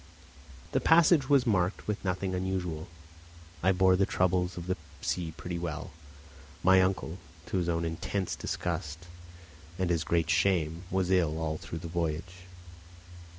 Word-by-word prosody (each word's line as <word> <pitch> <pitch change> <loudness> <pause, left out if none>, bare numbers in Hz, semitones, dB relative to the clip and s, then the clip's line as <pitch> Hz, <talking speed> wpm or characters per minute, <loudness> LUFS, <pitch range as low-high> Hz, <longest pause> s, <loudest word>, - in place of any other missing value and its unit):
The - - +1
passage 160 -4 +5
was 140 -3 +5
marked 95 -4 +1
by 105 - 0
nothing 95 0 -1
unusual. 90 -3 -2 0.7
I 95 - +4
bore 95 0 +4
the 95 +1 +2
troubles 90 -1 +1
of 85 - -5
the 90 0 0 0.2
sea 85 -3 -2
pretty 90 -1 -4
well; 80 -3 -4 0.7
my 95 +1 +6
uncle, 95 -2 -1 0.3
to - - -2
his 85 -2 0
own 85 0 0
intense 90 +3 -2
disgust, 80 +3 -4 0.7
and 95 -2 0
his 85 -2 +1
greater 85 -1 +1
shame, 85 -2 +1
was 95 0 0
ill 85 -4 +2
all 80 -1 -2
through 80 0 -7
the - - -3
voyage. 85 +2 -3
90 Hz, 150 wpm, -30 LUFS, 85-95 Hz, 0.7 s, my